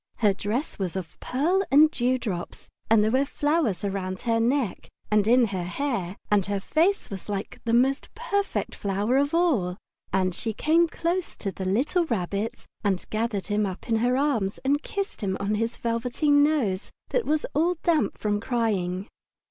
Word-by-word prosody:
Her 210 -3 +3
dress 210 +9 -3
was 185 -2 -2
of 185 -4 -6
pearl 330 +9 +1
and 305 +3 +6
dew 255 -1 +1
drops, 190 -8 -5 0.2
and 220 -1 +5
there 215 - +2
were 260 +3 +3
flowers 290 - 0
round 190 -2 -3
her 230 -1 +1
neck 240 -2 0 0.2
and 210 -1 +3
in 245 +1 +6
her 190 -2 -2
hair, 195 -3 -2
and 205 -2 +4
her 200 -1 -1
face 335 - +1
was 195 +1 -7
like 200 -1 -4
the 230 - 0
most 265 +3 +2
perfect 405 -4 -1
flower 205 +5 0
of 285 +3 +1
all. 240 - +2 0.3
And 185 -1 +1
she 225 +5 -3
came 330 +8 +3
close 340 +2 -2
to 195 - -4
the 190 - -6
little 270 - +1
Rabbit 215 - -2 0.2
and 195 -3 0
gathered 215 -2 -1
him 210 0 0
up 185 +4 -7
in 225 -2 +2
her 245 +3 +2
arms 240 -9 0
and 285 +2 +2
kissed 395 -3 -4
him 190 -2 -1
on 200 +1 -1
his 225 +2 -1
velveteen 250 +6 +2
nose 250 -12 +1 0.2
that - - 0
was 305 0 +1
all 340 +4 +2
damp 330 -3 +2
from 205 -1 0
crying. 205 -5 -1
230 Hz, 180 wpm, -26 LUFS, 200-290 Hz, 0.3 s, and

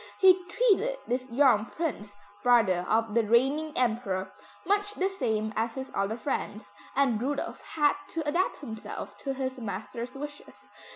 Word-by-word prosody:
He 370 -1 +6
treated - - +2
this 255 +2 -2
young 240 -4 +4
Prince, 230 -12 -4 0.3
brother 215 -8 +4
of 225 -1 +2
the 230 0 +4
reigning 270 +8 +2
Emperor, 220 -6 0 0.3
much 410 +1 +1
the 380 +1 +1
same 220 - -1
as 225 +1 -1
his 265 0 -5
other 200 +3 -1
friends, 220 -6 -3 0.2
and 260 -6 +2
Rudolph 280 +3 -2
had 295 -2 +4
to 320 -2 -4
adapt 345 +3 0
himself 220 -6 -7
to 275 -1 -3
his 260 0 -3
master's 230 +4 -5
wishes. 290 +1 -9
255 Hz, 150 wpm, -29 LUFS, 220-295 Hz, 0.3 s, He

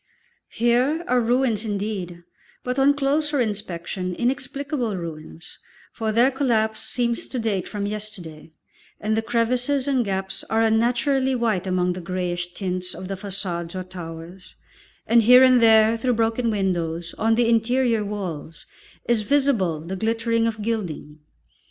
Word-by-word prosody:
Here 250 +8 +1
are 250 0 +3
ruins 235 -2 +1
indeed, 200 -5 -4 0.4
but 250 +2 -2
on 280 +1 +4
closer 290 +1 0
inspection, 190 -4 -3
inexplicable 255 - -2
ruins, 165 -1 -9 0.3
for 220 -2 -2
their 240 +5 +4
collapse 225 -5 0
seems 235 -2 -1
to 260 - -5
date 215 -6 -1
from 205 -1 -4
yesterday, 200 -7 -6 0.5
and 215 +1 0
the 220 - +1
crevices 245 +4 0
and 265 -3 +2
gaps 190 -2 -3
are 225 0 +2
unnaturally 245 +4 +2
white 220 -6 0
among 180 -1 +1
the 180 - -7
greyish 175 0 -3
tints 185 -2 -4
of 185 - -8
the - - -2
façades 185 -3 -4
or - - -4
towers, 175 0 -10 0.5
and 235 0 +5
here 250 +3 +8
and 255 -2 +6
there, 220 0 +6
through 250 +2 0
broken 230 +1 +1
windows, 175 -5 -2
on 225 +1 +3
the 235 0 +2
interior 230 0 +2
walls 180 -7 -6 0.4
is 235 -2 +2
visible 220 - +1
the 175 +4 -5
glittering 225 +2 0
of 220 -2 -3
gilding. 180 -9 -4
220 Hz, 145 wpm, -23 LUFS, 185-245 Hz, 0.5 s, here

